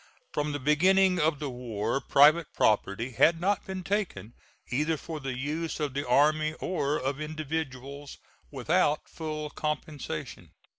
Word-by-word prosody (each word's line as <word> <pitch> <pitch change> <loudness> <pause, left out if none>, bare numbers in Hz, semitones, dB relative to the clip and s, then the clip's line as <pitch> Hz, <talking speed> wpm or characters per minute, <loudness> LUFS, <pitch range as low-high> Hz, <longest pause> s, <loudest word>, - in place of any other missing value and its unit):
From 150 0 -1
the 145 - -2
beginning 180 +6 +4
of 155 -1 +2
the 140 -2 -4
war 120 0 -2
private 150 +3 +5
property 110 +3 +1
had 165 +7 +4
not 195 +2 0
been 190 -1 -5
taken, 195 - -2 0.4
either 150 +5 +1
for 160 +1 -6
the 135 -3 -4
use 155 +6 -3
of 145 -3 -2
the 140 0 -3
army 155 +4 +3
or 150 -5 -1
of 135 +3 -3
individuals, 145 -3 -5 0.3
without 150 +3 +1
full 155 -2 -5
compensation. 150 - -5
150 Hz, 140 wpm, -28 LUFS, 135-160 Hz, 0.4 s, private